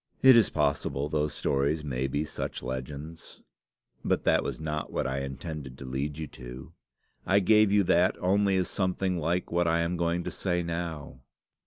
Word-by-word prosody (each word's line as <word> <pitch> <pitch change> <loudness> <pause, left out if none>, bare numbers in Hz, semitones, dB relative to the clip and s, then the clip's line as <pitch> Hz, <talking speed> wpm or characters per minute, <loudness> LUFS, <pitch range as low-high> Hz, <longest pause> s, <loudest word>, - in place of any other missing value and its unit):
"It 130 -1 +9
is 115 -3 +5
possible 70 -1 0
those 75 0 0
stories 70 +3 0
may 65 -2 -2
be 70 +3 -1
such 80 - -5
legends; 70 +5 -7 0.6
but - - 0
that - - +3
was - - -4
not 75 -1 -3
what - - -1
I 65 0 -1
intended 70 0 -6
to 70 - -9
lead 70 +3 -3
you 80 - -4
to. 65 -2 -10 0.5
I 95 +1 +3
gave 105 +1 +4
you 100 0 +4
that 90 +1 +3
only 95 +1 +2
as 90 - +1
something 95 -1 -1
like 85 +3 -1
what 85 0 +2
I 85 0 +2
am 85 +1 -1
going 85 +1 0
to - - -4
say 90 -2 -1
now. 85 -6 -5
80 Hz, 180 wpm, -28 LUFS, 70-90 Hz, 0.6 s, It